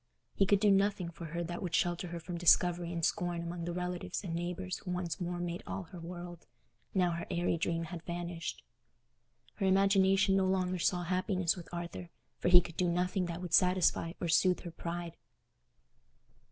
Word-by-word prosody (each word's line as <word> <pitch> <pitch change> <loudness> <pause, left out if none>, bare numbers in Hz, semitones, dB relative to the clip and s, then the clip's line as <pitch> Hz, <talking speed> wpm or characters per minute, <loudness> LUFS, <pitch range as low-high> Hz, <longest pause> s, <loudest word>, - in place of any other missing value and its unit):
He 195 - +2
could 200 0 +4
do 205 0 +4
nothing 195 -3 +2
for 170 0 -8
her 170 +2 -3
that 175 +1 -5
would 175 -2 -1
shelter 175 +1 0
her 170 0 -5
from 170 +2 -6
discovery 175 0 +4
and 170 -2 0
scorn 175 -1 -1
among 170 0 -4
the 175 - -2
relatives 180 +1 -3
and 175 -4 -4
neighbours 180 +2 -3
who 190 - -9
once 180 -1 -3
more 175 0 -2
made 175 0 -3
all 195 - -4
her 175 +1 -11
world, 175 0 -8 0.5
now 180 -2 +3
her 170 0 -4
airy 175 -1 +1
dream 165 0 -1
had 165 0 -6
vanished. 170 0 -5 0.9
Her 195 - +1
imagination 195 0 +4
no 190 -1 +3
longer 185 -1 0
saw 175 +1 +1
happiness 185 0 0
with 175 -3 -10
Arthur, 170 0 -6 0.3
for - - -1
he 180 0 +9
could 170 -1 -10
do 180 -1 +2
nothing 180 +1 0
that 170 +1 -5
would 175 -2 -6
satisfy 180 -2 +3
or 175 - -2
soothe 180 +2 +3
her 175 - -7
pride. 170 0 -5
175 Hz, 190 wpm, -32 LUFS, 170-185 Hz, 0.9 s, he